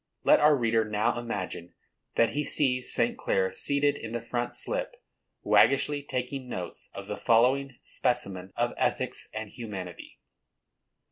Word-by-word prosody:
Let - - +6
our 150 0 +6
reader 115 -2 +2
now 110 +2 0
imagine 95 -7 -5 0.4
that 115 - +3
he 150 - -1
sees 125 -3 +2
St. 115 0 +2
Clare 95 -1 0
seated 140 +7 +1
in 115 0 -7
the 120 - -2
front 120 0 -2
slip, - - -2 0.5
waggishly 145 +1 +4
taking 130 -1 -4
notes 90 -6 -6
of - - -6
the - - -5
following 130 +3 +2
specimen 100 -7 -2
of - - 0
ethics - - -1
and 110 -1 -6
humanity. 100 -7 -8
120 Hz, 140 wpm, -28 LUFS, 105-135 Hz, 0.5 s, Let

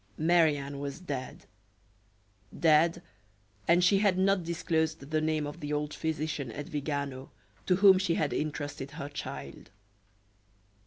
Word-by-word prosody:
Marie 160 -2 +4
Anne 140 0 -6
was 140 +1 -5
dead 140 -8 -6 1.1
dead, 165 +1 +4 0.6
and 175 +1 +5
she 195 +2 +5
had 200 -3 +3
not 190 -1 +2
disclosed 160 -3 -1
the 155 0 +1
name 155 -1 0
of 145 +3 -7
the 150 -2 -5
old 150 0 -2
physician 155 -5 -3
at 145 +2 -6
Vigano 140 -4 -4 0.4
to 180 - +4
whom 190 0 +7
she 175 -3 +1
had 150 -3 0
intrusted 145 -2 -3
her 140 - -5
child. 145 - -7
155 Hz, 140 wpm, -30 LUFS, 145-170 Hz, 1.1 s, whom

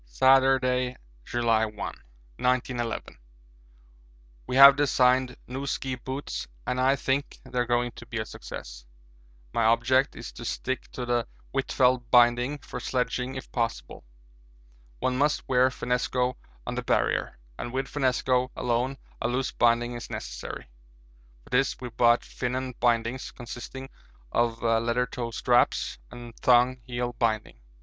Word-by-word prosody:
Saturday, 130 - +3 0.3
July 115 -2 +2
1, 105 -1 -3
1911. 110 - -3 1.3
We 125 - -2
have 140 +1 +10
designed 130 -3 +2
new 135 +3 -5
ski 130 -1 -2
boots 130 +3 -5 0.2
and 125 0 -1
I 135 +2 +4
think 140 +1 -1
they 130 -2 -4
are 120 - +1
going 120 0 +1
to 120 - -12
be 120 -1 -5
a 110 - -2
success. - - -9 0.7
My 115 - +2
object 130 +4 +3
is 120 - -8
to 120 - -10
stick 130 +2 -3
to 125 - -4
the 120 -1 0 0.3
Huitfeldt 130 -2 +2
binding 120 +3 +4
for - - -8
sledging 125 +1 -2
if 130 - -8
possible. 115 -1 -3 0.9
One 125 - -1
must 145 +1 +1
wear 130 0 +4
finnesko 125 0 -1 0.3
on - - -3
the - - -2
Barrier, - - 0 0.2
and 120 - -4
with 135 +1 -1
finnesko 130 -2 +1
alone 125 +3 -1 0.2
a - - +1
loose 125 +2 -1
binding 120 0 +2
is 120 -1 -7
necessary. - - -6 0.8
For - - -20
this 135 +2 +1
we 125 - -6
brought 120 +1 +3
'Finon' 130 +1 -3
bindings, 120 +1 +1
consisting 120 +2 -8 0.4
of 120 -1 0
leather 115 +2 +2
toe 120 -1 -5
straps 120 - +1
and 120 -1 -10
thong 125 0 +4
heel 120 0 -2
binding. 110 - -1
125 Hz, 140 wpm, -27 LUFS, 120-130 Hz, 1.3 s, have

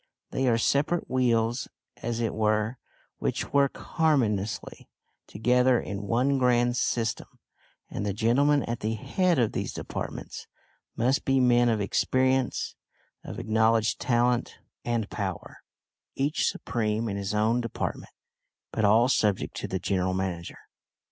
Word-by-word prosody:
They 130 0 0
are 115 -2 +3
separate 140 +8 +1
wheels, 120 -2 +1 0.3
as 120 0 -3
it 115 - -1
were, 110 +2 0 0.4
which - - -2
work 140 -1 +3
harmoniously 110 - -1 0.4
together 125 +3 +3
in 100 0 -5
one 130 +5 +2
grand 120 -1 +3
system, 115 -2 -1 0.6
and - - -5
the 105 - -1
gentlemen 130 +7 +2
at 115 0 -3
the 110 +1 -2
head 180 - +1
of 120 -4 +2
these - - -3
departments - - -6 0.5
must 130 +4 +1
be 135 0 +2
men 120 -1 +4
of 110 -2 +1
experience; 130 +5 +1 0.5
of - - -7
acknowledged 110 0 +2
talent 120 0 +1 0.3
and 115 -3 -1
power, 95 -4 -5 0.6
each 140 +3 0
supreme 110 -1 -2
in 100 - -3
his 100 +1 -3
own 110 +3 +2
department, 115 -2 -4 0.6
but 110 - -1
all 110 +4 +5
subject 105 -6 +1
to - - -4
the 95 - -2
general 95 0 0
manager. 90 -3 -3
115 Hz, 135 wpm, -27 LUFS, 105-125 Hz, 0.6 s, all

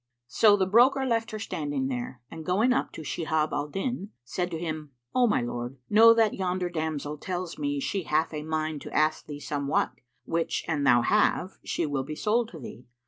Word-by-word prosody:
So 205 - +5
the 190 - +2
broker 250 +7 +4
left 230 -2 0
her 215 - -5
standing 145 -10 -3
there 125 -1 -4
and 160 -1 -7
going 210 +9 +2
up - - -1
to 160 - -7
Shihab 155 0 -1
al 145 0 -1
Din, 200 - -3
said 175 +8 -2
to 165 - -4
him, 155 -3 -5 0.2
"O 250 -1 +4
my 205 - +2
lord, 120 +2 -4
know 225 +2 +8
that 225 -2 +3
yonder 180 -1 -2
damsel 155 -2 -3
tells 180 -2 -4
me 145 -1 -1
she 185 +5 -2
hath 155 +2 +1
a 150 - -3
mind 155 -1 -2
to - - -8
ask 155 0 +1
thee 145 -1 -6
somewhat, 145 -1 0 0.3
which 165 0 -1
an 145 -3 0
thou 120 -2 +5
have, 195 - +1
she 170 - -1
will 145 -3 -1
be 155 +3 -6
sold 225 +6 +1
to 165 - -10
thee. 125 -1 -10
160 Hz, 200 wpm, -27 LUFS, 145-200 Hz, 0.3 s, know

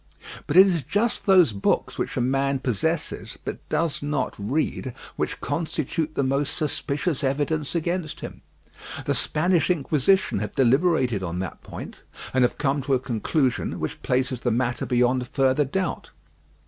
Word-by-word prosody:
But 150 - +1
it 190 - +11
is 175 -5 +1
just 205 - -1
those 180 - +6
books 100 - 0
which - - -2
a - - +2
man 135 +2 +1
possesses, 135 - -2
but - - -6
does 165 -2 0
not 145 -2 -1
read, 130 +2 -2 0.2
which - - -2
constitute 155 +1 -2
the 140 - +1
most 135 +2 0
suspicious 150 0 -1
evidence 145 +3 -1
against 170 -1 -2
him. - - -8 0.6
The - - +1
Spanish 175 +1 +1
Inquisition 160 - +2
have 105 - -5
deliberated 130 - +3
on 90 -1 -3
that 95 -1 -5
point, - - -8 0.4
and 130 - +3
have 125 - +1
come 140 0 +1
to 135 +1 +1
a - - +1
conclusion 125 +2 -1
which - - -4
places 130 -1 0
the 120 - +1
matter 120 +1 0
beyond 125 0 +2
further 135 +2 +2
doubt. 185 +6 -2
140 Hz, 155 wpm, -24 LUFS, 125-160 Hz, 0.6 s, it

